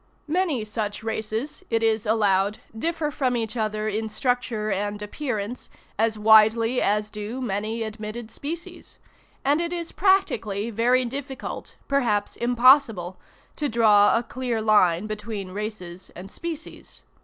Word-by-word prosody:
Many 310 Hz, -, 0 dB
such 210 Hz, -1 st, -4 dB
races, 220 Hz, +4 st, -3 dB
it 225 Hz, -1 st, +1 dB
is 220 Hz, -1 st, +1 dB
allowed, 205 Hz, -2 st, +2 dB, 0.2 s
differ 320 Hz, +4 st, -1 dB
from 255 Hz, -3 st, 0 dB
each 225 Hz, 0 st, -3 dB
other 215 Hz, -1 st, -1 dB
in 220 Hz, +1 st, -2 dB
structure 240 Hz, -3 st, -1 dB
and 205 Hz, +1 st, -2 dB
appearance 215 Hz, 0 st, -4 dB, 0.3 s
as 220 Hz, 0 st, +2 dB
widely 220 Hz, +3 st, +5 dB
as 210 Hz, +1 st, +1 dB
do 210 Hz, +4 st, -5 dB
many 220 Hz, -1 st, -2 dB
admitted 220 Hz, +1 st, -6 dB
species; 330 Hz, +4 st, -7 dB, 0.5 s
and 290 Hz, +4 st, +3 dB
it 340 Hz, 0 st, -2 dB
is 340 Hz, -1 st, -4 dB
practically 235 Hz, -, +1 dB
very 245 Hz, +4 st, +3 dB
difficult, 265 Hz, +2 st, -6 dB
perhaps 240 Hz, -7 st, +1 dB
impossible, 240 Hz, -7 st, +4 dB, 0.4 s
to 295 Hz, -1 st, -1 dB
draw 215 Hz, -2 st, +5 dB
a 235 Hz, -, -1 dB
clear 245 Hz, -1 st, -3 dB
line 210 Hz, -4 st, +3 dB
between 210 Hz, -2 st, -5 dB
races 190 Hz, -3 st, -6 dB
and 190 Hz, +3 st, -9 dB
species. 330 Hz, -2 st, -8 dB
220 Hz, 130 wpm, -24 LUFS, 210-255 Hz, 0.5 s, widely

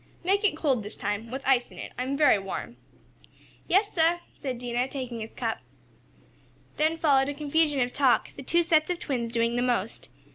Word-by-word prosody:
"Make 395 Hz, +4 st, +2 dB
it 390 Hz, -7 st, +2 dB
cold, 275 Hz, -7 st, +1 dB
this 210 Hz, 0 st, -8 dB
time 210 Hz, +3 st, -3 dB
with 265 Hz, +3 st, -5 dB
ice 255 Hz, -2 st, +3 dB
in -, -, -15 dB
it. -, -, -7 dB
I -, -, -4 dB
am 270 Hz, +2 st, -2 dB
very 295 Hz, -8 st, +5 dB
warm." 195 Hz, +5 st, -6 dB, 0.9 s
"Yais 405 Hz, +3 st, +3 dB
sah," 335 Hz, 0 st, +3 dB, 0.2 s
said 260 Hz, -4 st, -5 dB
Dinah, 245 Hz, +1 st, -1 dB
taking 255 Hz, -4 st, -5 dB
his 220 Hz, 0 st, -6 dB
cup. -, -, -3 dB, 1.2 s
Then 315 Hz, +2 st, +2 dB
followed 280 Hz, -4 st, +3 dB
a 285 Hz, -, -4 dB
confusion 300 Hz, 0 st, +1 dB
of 245 Hz, 0 st, -1 dB
talk, 270 Hz, -3 st, +3 dB
the -, -, -8 dB
two 340 Hz, +6 st, +2 dB
sets 315 Hz, -1 st, +3 dB
of 355 Hz, -, 0 dB
twins 245 Hz, -8 st, -3 dB
doing 230 Hz, 0 st, +1 dB
the -, -, +1 dB
most. 240 Hz, -4 st, -1 dB
270 Hz, 195 wpm, -27 LUFS, 240-315 Hz, 1.2 s, very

